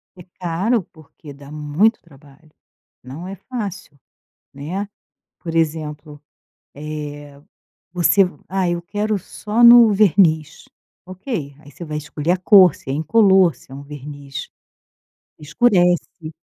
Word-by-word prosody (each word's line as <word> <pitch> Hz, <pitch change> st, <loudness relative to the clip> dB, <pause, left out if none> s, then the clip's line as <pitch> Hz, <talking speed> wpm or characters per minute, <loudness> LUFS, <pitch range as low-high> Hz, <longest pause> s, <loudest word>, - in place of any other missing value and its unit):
É 180 Hz, -, -13 dB, 0.2 s
caro, 185 Hz, +6 st, -1 dB
porque 155 Hz, -1 st, -15 dB
dá 140 Hz, 0 st, -14 dB
muito 155 Hz, +9 st, 0 dB
trabalho, 150 Hz, 0 st, -21 dB, 0.5 s
não 145 Hz, +8 st, -9 dB
é 195 Hz, -, -7 dB
fácil, 200 Hz, -, -8 dB, 0.5 s
né. 175 Hz, +9 st, -5 dB, 0.5 s
Por 165 Hz, -2 st, -6 dB
exemplo, 155 Hz, -2 st, -3 dB, 1.5 s
eh, -, -, -
você 180 Hz, +3 st, +4 dB
v 180 Hz, -, -9 dB
"ah, 190 Hz, -2 st, -1 dB
eu 175 Hz, 0 st, -2 dB
quero 210 Hz, +3 st, -2 dB
só 210 Hz, +4 st, -2 dB
no 235 Hz, -2 st, +8 dB
verniz", 165 Hz, -, +2 dB, 0.4 s
ok, 185 Hz, -, -6 dB
aí 145 Hz, -1 st, -16 dB
você 175 Hz, -, -10 dB
vai 150 Hz, -1 st, -5 dB
escolher 150 Hz, +2 st, -3 dB
a 185 Hz, -, +1 dB
cor 185 Hz, -3 st, +6 dB
se -, -, -13 dB
é 135 Hz, -, -1 dB
incolor, 190 Hz, +1 st, +3 dB
se -, -, -21 dB
é -, -, -9 dB
um 140 Hz, -, -9 dB
verniz 145 Hz, -1 st, -9 dB, 0.9 s
que -, -, -21 dB
escurece. 175 Hz, -2 st, 0 dB
170 Hz, 135 wpm, -19 LUFS, 150-195 Hz, 1.5 s, no